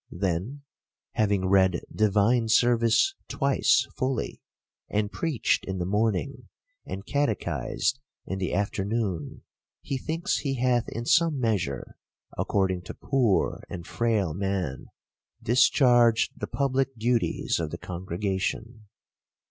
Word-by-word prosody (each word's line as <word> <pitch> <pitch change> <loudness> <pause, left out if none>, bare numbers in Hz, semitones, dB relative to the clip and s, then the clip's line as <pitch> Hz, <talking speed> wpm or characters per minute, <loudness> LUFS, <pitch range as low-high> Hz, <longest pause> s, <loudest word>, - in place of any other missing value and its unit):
Then, 95 +10 -3 0.5
having 100 -3 +1
read 95 -2 +3
divine 110 +3 +3
service 120 - +4
twice 140 -1 +2
fully, 130 -1 -2 0.5
and 105 0 -1
preached 160 -8 0
in 95 0 -4
the 90 - -2
morning, 110 +6 -1 0.4
and 95 +2 -6
catechised 135 -4 -1 0.3
in 95 - -4
the 95 - -2
afternoon, 100 -5 -2 0.4
he 135 - -3
thinks 165 +5 -1
he 135 -2 -2
hath 125 -2 +1
in 115 +1 -5
some 165 0 +3
measure, 100 - -2 0.4
according 95 -2 0
to - - -7
poor 125 -8 +1
and 85 -1 -7
frail 110 -8 0
man, 95 -6 -3 0.6
discharged 120 -1 +4
the - - -5
public 135 -2 -1
duties 120 -3 0
of 80 -2 -2
the - - -6
congregation. 95 +5 -4
110 Hz, 115 wpm, -26 LUFS, 95-125 Hz, 0.6 s, service